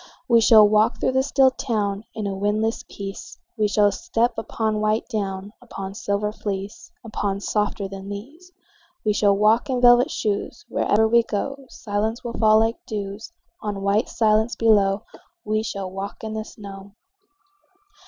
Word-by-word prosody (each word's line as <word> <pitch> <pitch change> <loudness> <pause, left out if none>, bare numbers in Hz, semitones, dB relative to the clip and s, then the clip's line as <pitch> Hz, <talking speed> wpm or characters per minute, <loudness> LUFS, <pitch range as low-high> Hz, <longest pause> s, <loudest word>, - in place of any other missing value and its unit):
We 235 -2 +5
shall 215 -1 +7
walk 215 +3 +2
through - - +1
the 260 0 +2
still 270 -1 +3
town 210 -5 -2
In 215 - -3
a 200 - -2
windless 210 +3 -1
peace; 200 +3 -8 0.2
We 215 -2 +1
shall 205 0 +3
step 235 +4 0
upon 220 -1 -2
white 215 +1 0
down, 200 -3 -4
Upon 195 -5 -7
silver 200 +1 -2
fleece, 205 - -6
Upon 205 -3 -2
softer 205 -1 -1
than 195 0 -8
these. 285 - -9 0.5
We 210 - +3
shall 200 -1 +3
walk 215 +5 +3
in 255 -1 0
velvet 245 +1 +6
shoes: 205 -2 -3
Wherever 220 +2 +2
we 235 +1 +5
go 270 +5 -4
Silence 220 +3 -3
will 235 -1 -5
fall 215 -1 +4
like 225 +1 -1
dews 205 - -5 0.3
On 205 -3 -4
white 200 +4 +1
silence 220 +1 +2
below. 205 -3 +3 0.4
We 215 0 0
shall 195 -4 -5
walk 195 +3 -7
in 220 -1 -4
the 215 0 -4
snow. 200 -2 -11
215 Hz, 160 wpm, -23 LUFS, 200-230 Hz, 0.5 s, shall